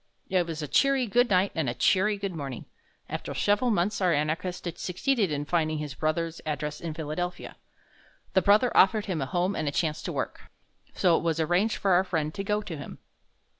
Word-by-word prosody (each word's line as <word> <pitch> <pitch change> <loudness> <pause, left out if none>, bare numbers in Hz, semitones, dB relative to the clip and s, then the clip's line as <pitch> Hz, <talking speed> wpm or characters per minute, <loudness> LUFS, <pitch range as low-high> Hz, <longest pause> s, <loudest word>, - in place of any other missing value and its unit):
It 180 -2 +2
was 160 -2 -4
a - - -3
cheery 275 - +3
"good 240 +3 +2
night" 190 0 +3
and 155 -6 -1
a 120 - -3
cheery 205 - +2
"good 200 -2 -4
morning." 135 -6 -6 0.4
After - - -5
several 205 +5 +2
months 205 0 0
our 180 -2 +3
anarchist 165 +5 -1
succeeded 205 +3 0
in 145 0 -2
finding 155 -1 0
his 150 -2 -5
brother's 160 +3 -2
address 150 0 -4
in 165 -2 -5
Philadelphia. 165 +3 -4 0.8
The 190 - +4
brother 210 +6 +4
offered 210 +2 +5
him 180 -7 -2
a 135 - -2
home 180 +5 0
and 155 - -2
a - - +1
chance 155 +1 -1
to - - -4
work, - - -5 0.5
so 175 -3 +4
it - - -2
was 165 -1 0
arranged 175 +7 +1
for 195 - +1
our 180 +1 +5
friend 160 -5 -2
to 195 - -4
go 210 +1 0
to 170 - -6
him. 145 - -8
175 Hz, 205 wpm, -27 LUFS, 155-200 Hz, 0.8 s, offered